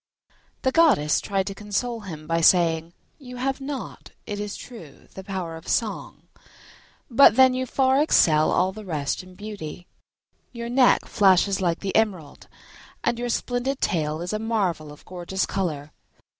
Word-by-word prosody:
The 260 - +2
goddess 260 - +3
tried 195 -1 -1
to 200 - -4
console 210 +4 -3
him 165 -7 -9
by 165 +1 0
saying, 165 -1 +3 0.3
"You 250 -3 -10
have 270 +2 -2
not, 275 0 -7 0.2
it 205 -1 -5
is 205 -1 -4
true, 175 - -12
the 190 - -9
power 185 -4 -5
of 160 +3 -12
song, 220 -4 -2 0.8
but 260 +3 +6
then 260 -1 +6
you 255 0 -2
far 265 +2 +2
excel 155 - +4
all 185 +1 +2
the 215 +2 -10
rest 155 -7 -3
in 185 0 -15
beauty: 195 -5 -8 0.7
your 235 -1 -6
neck 250 0 +4
flashes 195 -2 +3
like 170 -2 0
the 195 -1 -4
emerald 190 -10 -1 0.6
and 235 - 0
your 245 0 -3
splendid 245 +3 -2
tail 155 -4 -1
is 175 +4 -4
a 215 - -1
marvel 195 -9 -1
of 150 - -15
gorgeous 185 +1 -3
colour." 155 -6 -3
195 Hz, 160 wpm, -24 LUFS, 170-240 Hz, 0.8 s, but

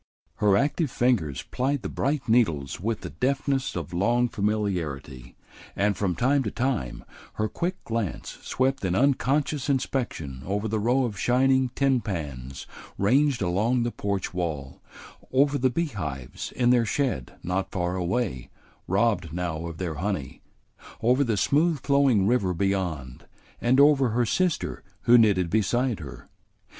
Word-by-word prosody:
Her 100 -2 +4
active 145 - +1
fingers 100 - 0
plied 135 +1 -2
the - - -2
bright 140 0 -1
needles 85 - +1
with 110 +4 -2
the - - -7
deftness 135 0 -1
of 85 -1 -5
long 120 +7 +2
familiarity, 85 - -3 0.4
and 100 0 +1
from 90 -2 -1
time 135 - +2
to 110 - -2
time 120 - -2 0.3
her 110 - -1
quick 175 - -3
glance 115 -5 -4
swept 130 -1 0
in 90 -1 0
unconscious 140 +3 +1
inspection 120 - -2
over 100 +3 -2
the 110 0 -1
row 125 +5 +2
of 105 -6 -5
shining 130 +1 +3
tin 135 -3 +2
pans 70 - -5 0.3
ranged 130 +3 +2
along 110 +8 +1
the 120 - -1
porch 100 -4 -3
wall, 75 -7 -4 0.5
over 140 +2 +3
the 130 +1 +3
beehives 90 - -4
in 125 -1 +3
their 120 -2 +4
shed 115 - -2
not 95 +2 -1
far 90 -1 -2
away, 90 - -2 0.4
robbed 95 -4 +1
now 85 -1 -3
of 85 -1 -7
their 85 -3 -3
honey, 95 -9 -3 0.6
over 125 +5 +3
the 115 -5 0
smooth 155 - +2
flowing 135 -7 +3
river 100 -5 +1
beyond, 85 -9 -2 0.3
and 125 +3 +3
over 140 -3 +5
her 120 +2 +1
sister 180 +7 -1 0.2
who 120 - +5
knitted 100 -7 +4
beside 115 +2 +1
her. 70 -6 -10
110 Hz, 145 wpm, -26 LUFS, 90-130 Hz, 0.6 s, over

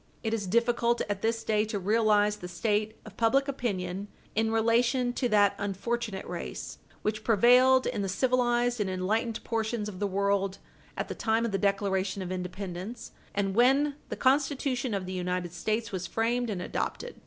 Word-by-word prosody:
It 220 -1 -1
is 210 -4 -2
difficult 235 +3 +2
at 205 -1 -3
this 225 0 0
day 215 -1 +2
to 215 -1 -3
realize 210 +1 +3
the 180 - -7
state 210 +3 -1
of 215 -2 -12
public 270 +5 +3
opinion 200 -7 -3 0.3
in 220 +1 +1
relation 240 +2 +2
to 245 0 0
that 205 -2 +4
unfortunate 205 +1 -3
race - - -6 0.2
which 215 0 -1
prevailed 250 +4 +5
in - - -1
the 195 - -2
civilized 245 +2 +1
and 195 - 0
enlightened 215 +5 -1
portions 225 -1 -2
of 190 -3 -7
the 205 - 0
world 195 0 0 0.4
at - - -2
the - - -4
time 225 +1 +1
of 230 - -2
the 195 - 0
Declaration 195 -1 0
of 180 - -5
Independence 185 +4 -5 0.2
and 195 -1 0
when 270 +6 +4
the - - -3
Constitution 265 -3 +1
of 190 -2 -3
the 185 - -5
United 180 -1 -2
States 215 +5 -2
was 185 -2 -3
framed 235 +2 0
and 185 -4 -3
adopted. 485 - -4
215 Hz, 175 wpm, -29 LUFS, 195-240 Hz, 0.4 s, prevailed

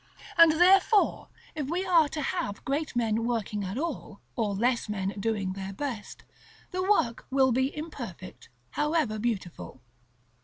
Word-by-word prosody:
And 335 -1 +7
therefore, 385 +5 +4 0.3
if 295 -4 -4
we 360 +4 -1
are 335 -5 +4
to 300 -1 -4
have 330 - -3
great 285 0 -2
men 225 -1 +1
working 220 -3 -2
at 190 +4 -4
all, 285 -9 -4 0.2
or 210 -4 -1
less 235 +2 0
men 195 -2 -2
doing 200 -3 -1
their 195 0 -6
best, 235 -2 -6 0.5
the 370 0 -2
work 370 - +1
will 265 -1 +3
be 260 +4 0
imperfect, 240 - -8 0.2
however 295 - 0
beautiful. 200 - -4
245 Hz, 145 wpm, -28 LUFS, 210-315 Hz, 0.5 s, And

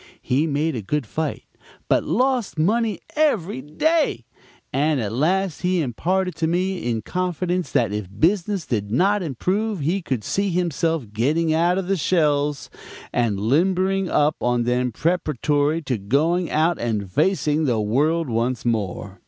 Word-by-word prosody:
He 140 +6 0
made 150 +1 0
a 115 - -3
good 145 +7 -2
fight, 155 +9 -3 0.4
but - - +2
lost 255 -8 0
money 215 +6 +1
every 215 - +1
day; 280 - 0 0.5
and 145 +2 +2
at 110 -3 -3
last 175 +6 0
he 180 0 +1
imparted 180 +7 -1
to 165 0 0
me 180 -4 -1
in 110 -2 -2
confidence 180 +1 -2
that 110 -4 +1
if 105 -2 -3
business 185 +1 +1
did 105 -6 -2
not 195 - +2
improve 185 - -1
he 175 +7 0
could 130 -9 -3
see 200 - 0
himself 165 - -1
getting 155 +8 +1
out 170 +3 +3
the 195 +2 +1
shells 150 -4 +1 0.4
and 115 -5 +1
limbering 185 - +1
up 150 +1 +2
on 120 -1 +1
them 125 +1 0
preparatory 150 +1 0
to 125 -5 -2
going 155 - +1
out 160 +2 +1
and 105 -5 -2
facing 155 - +1
the 120 -5 +1
world 150 +10 +1
once 120 +1 -1
more. 100 -4 -2
155 Hz, 150 wpm, -22 LUFS, 125-180 Hz, 0.5 s, out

